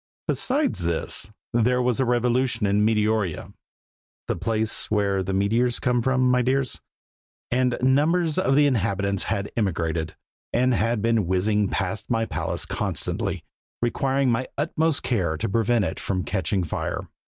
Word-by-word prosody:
Besides 275 - +1
this, 85 +3 0 0.2
there 120 +2 +3
was 125 -1 +1
a 130 - +3
revolution 125 -1 +1
in 100 +1 +2
Meteoria 105 -5 0 0.7
(the - - 0
place 110 -1 -1
where 100 -2 +1
the 95 +1 -3
meteors 115 +5 +1
come 125 -1 +1
from, 130 +1 +1
my 125 0 +3
dears), 130 +1 0 0.7
and 125 0 +1
numbers 155 +5 +2
of 135 -7 +2
the 145 +1 +5
inhabitants 100 -6 0
had 100 -1 -2
emigrated, 80 -6 -1 0.4
and 125 +1 +2
had 115 -1 0
been 115 -5 +2
whizzing 100 +3 +1
past 95 +2 -3
my 115 -2 +1
palace - - -3
constantly, - - -3 0.4
requiring 135 +2 +1
my 125 +3 0
utmost 155 +1 0
care 95 -11 0
to - - -2
prevent 115 +1 +2
it - - -4
from 95 -2 -2
catching 95 -1 -1
fire. 80 - -3
115 Hz, 145 wpm, -24 LUFS, 100-125 Hz, 0.7 s, the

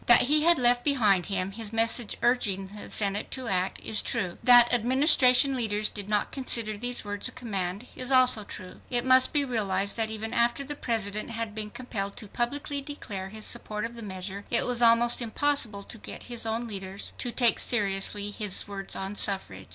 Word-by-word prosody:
That 240 - +7
he 300 +4 +2
had 340 +1 +4
left 245 -1 +4
behind 210 - +1
him 195 -1 -3
his 215 0 -6
message 225 0 +1
urging 205 -5 0
the 210 - -9
Senate 200 0 -1
to 260 -2 -4
act, 185 -1 -1
is 215 - +1
true. 185 -7 -3
That 245 -1 +6
Administration 260 +2 +4
leaders 215 -3 -1
did 205 0 -6
not 210 -1 -1
consider 230 -5 0
these 245 +2 -2
words 205 0 -1
a - - -4
command, 195 -2 -5
is 255 +1 -2
also 255 -4 +6
true. 185 -2 -9
It 245 0 0
must 260 0 +6
be 290 -2 +1
realized 200 -5 -1
that 225 -1 0
even 220 +1 -6
after 235 +3 0
the 290 +2 -5
President 215 -5 -3
had 230 -2 -5
been 215 0 -4
compelled 205 -4 -5
to 215 - -3
publicly 280 +6 -2
declare 210 -10 -7
his 215 +1 -5
support 210 +1 -2
of 235 - -7
the 235 - -8
measure, 195 -1 -7
it 235 - +3
was 245 -1 0
almost 235 +1 +4
impossible 235 -3 0
to 220 - -5
get - - -9
his 235 -2 -2
own 225 +2 -2
leaders 195 -2 -6
to 245 - -2
take 235 -2 +2
seriously 205 -2 0
his 205 -2 0
words 195 -1 -6
on 195 +1 -5
suffrage. 145 - +1
225 Hz, 195 wpm, -26 LUFS, 200-245 Hz, -, That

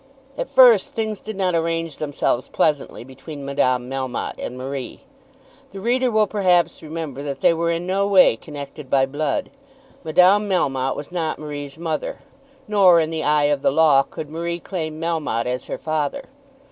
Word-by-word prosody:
At 265 - -4
first 250 -7 +6
things 220 -2 -2
did 220 0 -7
not 185 -2 +1
arrange 165 -2 -1
themselves 145 -4 -1
pleasantly 145 -5 -1
between 135 +3 -10
Madame 130 -3 0
Melmotte 130 -1 -4
and 125 - -5
Marie. 130 -1 -6 0.7
The 195 - -9
reader 250 +5 +1
will 215 -2 +3
perhaps 180 -5 +1
remember 155 -4 -6
that 140 -2 -5
they - - +5
were 170 +1 -1
in 170 +1 -1
no 195 +2 0
way 190 - +6
connected 140 +2 -9
by 135 -1 +3
blood. 155 - -2 0.5
Madame 185 +6 +4
Melmotte 135 -8 0
was 145 - -8
not 165 -3 -2
Marie's 145 -1 -7
mother, 160 -2 -3 0.5
nor, 190 -5 +5
in 160 0 0
the 160 -1 -2
eye 150 0 +3
of 140 - -3
the - - +3
law, 145 -1 +5
could 150 +2 -7
Marie 170 +1 -3
claim 155 -4 -5
Melmotte 160 -8 -1
as 125 +1 -3
her - - -4
father. 155 - -2
160 Hz, 170 wpm, -21 LUFS, 140-180 Hz, 0.7 s, first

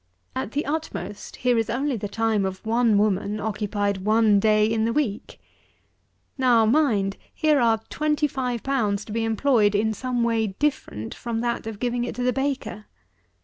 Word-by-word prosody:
At 135 +12 -3
the 290 - -1
utmost 280 - -5
here 245 -2 +1
is 225 - -1
only 270 +3 0
the 210 -2 -4
time 220 0 0
of 190 +2 -4
one 230 -1 +3
woman 205 0 +1
occupied 205 -1 -1
one 215 +1 +3
day 215 0 +4
in 220 0 0
the 230 - +1
week. 245 -9 -2 1.0
Now 240 -4 +4
mind, 215 -7 +2
here 310 -3 +2
are 225 -2 +3
twenty 300 0 0
five 250 -4 -2
pounds 220 -8 0
to - - -10
be 225 +1 -1
employed 225 -2 +2
in 220 +2 +1
some 250 +1 -2
way 225 -2 +1
different 285 - -2
from 230 -1 -4
that 235 -2 -2
of 220 -2 -5
giving 240 +1 -1
it 245 - -4
to 250 - -3
the 250 0 +2
baker. 270 -5 -3
225 Hz, 175 wpm, -24 LUFS, 210-250 Hz, 1.0 s, day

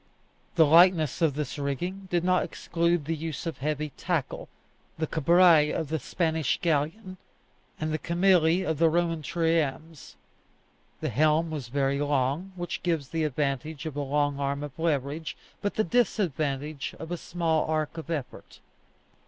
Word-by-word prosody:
The 165 -2 +6
lightness 165 -1 +5
of 155 -5 +2
this 145 -1 -4
rigging 175 +8 -3
did 175 -2 +1
not 180 0 +3
exclude 170 -2 -1
the 165 +2 -1
use 160 -1 -5
of 165 - -4
heavy 150 +1 -2
tackle, 170 -6 -2 0.5
the 160 - 0
cabrias 165 0 +4
of 155 - -4
the 160 0 -1
Spanish 160 +1 0
galleon, 170 +5 -1 0.6
and 155 0 -2
the 155 - -1
cameli 175 0 +3
of 160 -2 -1
the 165 -1 +5
Roman 165 -1 0
triremes. 160 -1 -1 0.9
The - - -1
helm 155 +2 +2
was 145 -6 -4
very 135 +2 0
long, 145 +5 0
which 175 -1 -4
gives 165 -6 -1
the 160 -1 -1
advantage 145 +2 -2
of 155 -3 -5
a 145 - -2
long 145 0 0
arm 140 +1 -1
of 145 +1 -8
leverage, 155 -1 -1 0.2
but 205 - -2
the 215 - +2
disadvantage 155 - -1
of 160 +1 -8
a - - 0
small 165 -2 -1
arc 155 0 -1
of 160 - -9
effort. 145 -6 -6
160 Hz, 155 wpm, -27 LUFS, 145-170 Hz, 0.9 s, The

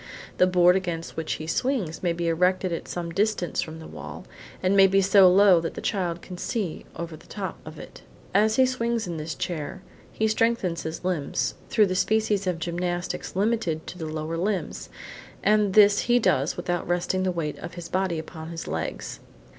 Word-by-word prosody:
The 180 - +6
board 180 0 +5
against 175 -3 -3
which 160 -1 -2
he 155 - -5
swings 185 - -1
may 175 - +1
be 170 0 -2
erected 180 +2 +1
at 165 - -5
some 170 -1 -4
distance 200 -1 0
from 160 0 -6
the 160 - -10
wall, - - -9 0.4
and 185 +2 +3
may 195 -1 +8
be 195 +1 +3
so 195 -1 +6
low 190 -2 +6
that 165 0 -4
the - - -5
child 175 -5 -2
can 180 -1 -9
see 195 -7 -3
over 170 -1 -5
the 155 - -17
top 190 -4 -5
of 155 0 -9
it. - - -11 0.3
As 215 +3 +4
he 260 - +5
swings 235 -3 -1
in 170 -2 -4
this 155 -1 -4
chair, 165 +3 -4 0.3
he 220 - 0
strengthens 220 -6 +1
his 160 +2 -6
limbs 140 -8 -1 0.2
through 215 - +4
the 185 - -1
species 210 0 +1
of 180 -2 0
gymnastics 175 +2 -3
limited 195 -6 0
to 180 - -8
the 160 - -4
lower 155 +1 -3
limbs, 190 +2 -2 0.5
and 210 -2 +3
this 205 -1 +7
he 240 0 +3
does 145 - +1
without 175 -1 -2
resting 175 +2 0
the 185 0 +1
weight 160 -4 -3
of 170 0 -8
his 175 -1 -7
body 185 -1 0
upon 160 0 -7
his 165 -1 -6
legs. 80 -1 -4
180 Hz, 195 wpm, -25 LUFS, 165-200 Hz, 0.5 s, may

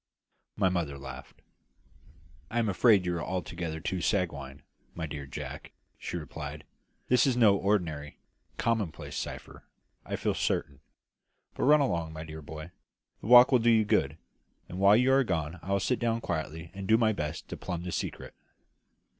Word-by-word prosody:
My 100 - +2
mother 85 -6 -1
laughed. 65 -1 -10 1.1
"I 115 - -4
am 115 -3 +2
afraid 100 -1 +4
you 90 -1 0
are 85 - -3
altogether 85 -3 -4
too 90 +3 -3
sanguine, 70 -9 -2 0.3
my 80 - -3
dear 75 -2 -6
Jack," 65 - -7 0.3
she - - -4
replied; 75 -2 -7 0.4
"this 125 +1 +4
is 125 -2 +1
no 110 -5 +6
ordinary, 85 -8 -1 0.4
commonplace 110 -10 -2
cipher, - - -6 0.4
I - - -4
feel - - 0
certain. 70 -1 -1 0.7
But - - -1
run 150 +2 +6
along, 85 - -1
my 80 0 -6
dear 80 -1 -8
boy, 80 +3 -9 0.5
the - - -8
walk 125 +2 +9
will 130 - +5
do 120 +1 +3
you 110 -2 +4
good; 75 -6 +1 0.5
and 90 - -7
while 100 +2 +6
you 125 +2 +3
are 135 0 +5
gone 80 -5 -2
I 95 - -6
will 100 - +3
sit 125 +6 0
down 115 -1 0
quietly 80 -3 -4
and 95 -1 -6
do 110 - +5
my 110 -1 +3
best 75 -4 -4
to - - -4
plumb 85 -2 -5
the 90 - -4
secret." - - -4
90 Hz, 170 wpm, -29 LUFS, 80-110 Hz, 1.1 s, walk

